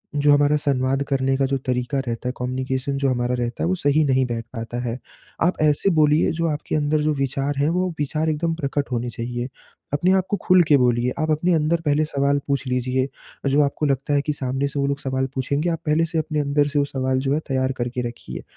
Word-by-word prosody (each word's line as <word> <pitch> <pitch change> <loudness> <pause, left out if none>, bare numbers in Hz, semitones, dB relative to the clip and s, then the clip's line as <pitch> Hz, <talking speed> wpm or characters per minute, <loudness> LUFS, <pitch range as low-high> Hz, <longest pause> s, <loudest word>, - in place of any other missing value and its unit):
जो 145 0 +4
हमारा 145 +1 +4
संवाद 135 -2 0
करने 135 -1 +1
का 135 - +2
जो 135 +1 0
तरीका 130 +1 -1
रहता 115 +1 -3
है, - - -3
कम्युनिकेशन 130 +2 -2
जो 135 0 +1
हमारा 125 -1 0
रहता 120 -1 -3
है - - +1
वो 185 - +1
सही 155 -2 +2
नहीं 130 -1 +2
बैठ 115 -1 -4
पाता 115 0 -5
है। 120 0 -3 0.5
आप 180 - +1
ऐसे 150 +5 +3
बोलिए 150 0 +4
जो 165 +1 -1
आपके 150 +1 -3
अंदर 150 0 +1
जो 155 0 +1
विचार 135 0 -1
हैं, 145 +2 +2
वो 180 +2 0
विचार 155 +2 0
एकदम 165 +2 0
प्रकट 140 -3 -2
होने 120 0 -1
चाहिए, 120 +1 -4 0.5
अपने 175 +6 +2
आप 190 -1 +2
को 205 - 0
खुल 185 -1 +6
के 150 -3 +6
बोलिए 125 -1 +2
आप 155 0 +1
अपने 170 +4 +2
अंदर 165 +1 +1
पहले 150 +1 +3
सवाल 140 -1 +1
पूछ 140 0 0
लीजिए। 125 +1 0 0.4
जो 145 +2 +4
आपको 145 +2 -1
लगता 140 +1 0
है 140 - +3
कि 150 +1 -2
सामने 135 0 -1
से 140 0 -4
वो 140 - +1
लोग 140 0 -1
सवाल 130 0 -1
पूछेंगे, 140 +5 0
आप 165 -1 -1
पहले 155 +2 +2
से 165 0 -4
अपने 155 -1 -2
अंदर 145 0 +2
से 145 0 0
वो 140 - +2
सवाल 130 -1 -1
जो 135 +1 0
है 150 - +1
तैयार 130 -1 0
करके 125 +1 -2
रखिए 120 - -8
140 Hz, 235 wpm, -22 LUFS, 130-150 Hz, 0.5 s, खुल